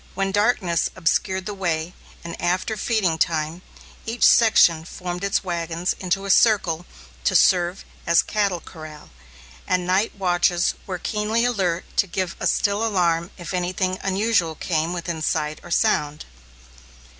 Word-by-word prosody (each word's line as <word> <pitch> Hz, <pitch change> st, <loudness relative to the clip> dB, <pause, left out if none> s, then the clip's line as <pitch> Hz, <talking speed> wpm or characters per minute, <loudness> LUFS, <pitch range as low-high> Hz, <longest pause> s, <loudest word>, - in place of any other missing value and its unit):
When 195 Hz, 0 st, -1 dB
darkness 200 Hz, -5 st, +1 dB
obscured 185 Hz, +1 st, 0 dB
the 210 Hz, -, -4 dB
way, 170 Hz, -3 st, -2 dB, 0.3 s
and 170 Hz, 0 st, -6 dB
after 180 Hz, +5 st, 0 dB
feeding 195 Hz, -7 st, 0 dB
time, 160 Hz, +1 st, -1 dB, 0.4 s
each 230 Hz, +2 st, -3 dB
section 175 Hz, -8 st, +5 dB
formed 180 Hz, +2 st, -6 dB
its 200 Hz, +1 st, 0 dB
wagons 170 Hz, 0 st, -2 dB
into 190 Hz, +1 st, -1 dB
a 195 Hz, -, +1 dB
circle 185 Hz, -6 st, +3 dB, 0.4 s
to -, -, +1 dB
serve 180 Hz, 0 st, +3 dB, 0.2 s
as 170 Hz, 0 st, +4 dB
cattle 200 Hz, -5 st, -1 dB
corral, 155 Hz, -2 st, -12 dB, 0.6 s
and 180 Hz, -1 st, 0 dB
night 190 Hz, +4 st, +1 dB
watches 175 Hz, -2 st, +1 dB
were 185 Hz, -2 st, -3 dB
keenly 215 Hz, +5 st, -1 dB
alert 185 Hz, -8 st, -1 dB
to 200 Hz, -, +3 dB
give 185 Hz, 0 st, -3 dB
a -, -, 0 dB
still 205 Hz, +2 st, +1 dB
alarm 175 Hz, -5 st, +1 dB
if 175 Hz, 0 st, -7 dB
anything 185 Hz, +1 st, -1 dB
unusual 195 Hz, -4 st, +1 dB
came 160 Hz, +1 st, -1 dB
within 170 Hz, -2 st, -4 dB
sight 155 Hz, 0 st, -1 dB
or -, -, -12 dB
sound. 150 Hz, -7 st, 0 dB
180 Hz, 145 wpm, -22 LUFS, 170-195 Hz, 0.6 s, section